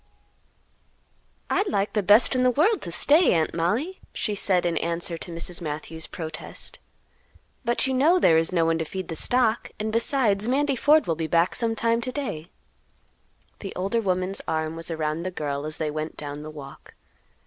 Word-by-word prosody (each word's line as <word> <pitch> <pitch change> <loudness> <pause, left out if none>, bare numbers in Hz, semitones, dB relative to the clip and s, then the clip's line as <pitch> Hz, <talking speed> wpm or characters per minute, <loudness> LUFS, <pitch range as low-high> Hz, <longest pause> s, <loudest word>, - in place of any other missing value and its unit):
"I'd 400 - 0
like 200 - -1
the 210 - +1
best 210 +7 +5
in 255 - +2
the 255 - +4
world 335 - +2
to 170 - -5
stay, 300 - +4
Aunt 160 -2 0
Mollie," 225 - -1
she 210 - -2
said, 185 -3 +1
in 170 -1 0
answer 170 +1 0
to 175 - -6
Mrs. 170 +1 -1
Matthews' 160 +1 -5
protest; 160 -2 -4 0.8
"but 240 +1 +3
you 265 - 0
know 300 +8 +4
there 165 - +4
is 165 +2 0
no 170 -2 +2
one 165 0 +1
to - - 0
feed 185 +2 -6
the 165 - -4
stock, 240 +5 +1
and 215 +1 -3
besides 225 -3 +2
Mandy 275 +2 +1
Ford 300 +5 +4
will 165 - 0
be 160 0 -3
back 170 +2 +2
sometime 230 0 0
to 255 - -3
day." 180 - -5 1.1
The 195 - -7
older 195 +5 -1
woman's 185 -1 -1
arm 160 0 -2
was 165 +1 -5
around 155 0 -2
the 185 - -3
girl 145 -4 -4
as 155 - -3
they 155 -2 -2
went 155 +1 -5
down 145 0 -6
the 155 - -8
walk. 145 -3 -12
185 Hz, 185 wpm, -25 LUFS, 160-235 Hz, 1.1 s, best